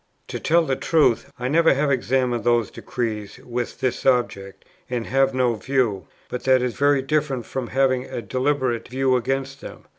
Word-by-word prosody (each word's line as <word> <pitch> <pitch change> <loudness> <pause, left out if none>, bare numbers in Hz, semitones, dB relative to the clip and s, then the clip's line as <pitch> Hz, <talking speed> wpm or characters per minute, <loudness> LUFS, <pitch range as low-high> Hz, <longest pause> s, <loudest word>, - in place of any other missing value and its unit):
To - - -4
tell 170 +1 +3
the 135 - 0
truth, 150 -5 +2
I 125 - -3
never 165 +2 +4
have 140 +1 +1
examined 125 -2 0
those 120 -2 +2
decrees 110 -4 -4
with 120 +1 -5
this 130 -2 -1
object, 120 -7 0 0.2
and 120 -2 -2
have 135 0 +2
no 125 -2 +2
view; 115 -4 -1 0.2
but 125 - -5
that 130 -1 +4
is 125 -2 -1
very 145 -1 +2
different 140 -4 -1
from 130 -2 -4
having 130 -1 +1
a - - -5
deliberate 130 +1 -1
view 130 0 +1
against 135 +2 -2
them. - - -10
130 Hz, 175 wpm, -23 LUFS, 120-135 Hz, 0.2 s, never